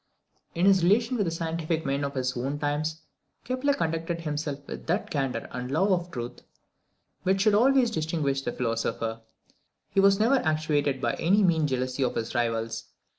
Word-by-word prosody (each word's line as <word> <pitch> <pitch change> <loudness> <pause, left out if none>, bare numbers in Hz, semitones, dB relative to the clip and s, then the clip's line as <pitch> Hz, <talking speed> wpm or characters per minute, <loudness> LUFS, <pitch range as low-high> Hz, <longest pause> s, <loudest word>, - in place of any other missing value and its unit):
In 170 +2 +2
his 195 -2 +5
relations 225 +7 +3
with 205 - +2
the - - 0
scientific 165 -1 -2
men 140 +1 0
of 140 0 -3
his 130 -1 -1
own 135 +4 -2
times, 150 +2 -2 0.4
Kepler 255 +3 0
conducted 165 -2 -2
himself 150 -2 -4
with - - -8
that 175 +5 -1
candour 135 -5 -2
and 125 0 -5
love 185 +9 +2
of 175 -1 0
truth 120 -6 -6 0.8
which 190 +1 +1
should 210 +1 +4
always 250 +2 +4
distinguish 155 -6 -1
the 120 - -3
philosopher. 115 -1 -2 0.7
He - - +2
was 195 0 +5
never 240 +6 +4
actuated 150 - 0
by - - +1
any 200 +5 +3
mean 160 -4 +3
jealousy 130 0 -2
of 125 - -1
his 115 0 -3
rivals. 115 -2 -1
155 Hz, 175 wpm, -27 LUFS, 135-190 Hz, 0.8 s, his